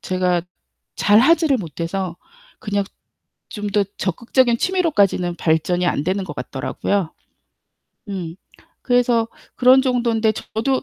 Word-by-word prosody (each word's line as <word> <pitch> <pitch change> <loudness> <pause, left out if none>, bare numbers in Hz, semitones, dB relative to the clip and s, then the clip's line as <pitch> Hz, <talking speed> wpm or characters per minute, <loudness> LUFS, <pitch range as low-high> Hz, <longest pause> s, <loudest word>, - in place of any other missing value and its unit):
제가 180 -2 0 0.5
잘 205 +1 +4
하지를 310 +1 +4
못해서 170 +1 -4 0.4
그냥 205 -3 -2 0.6
좀 210 -1 -5
더 205 0 +1
적극적인 235 +5 +1
취미로까지는 205 - +1
발전이 175 +3 +1
안 150 -4 0
되는 190 +2 -1
것 150 - -7
같더라고요. 160 +6 -2 1.0
음 180 -4 -5 0.5
그래서 245 -2 +2 0.3
그런 260 +1 +6
정도인데 235 -4 +1
저도 240 +5 -2
205 Hz, 260 characters per minute, -20 LUFS, 180-245 Hz, 1.0 s, 그런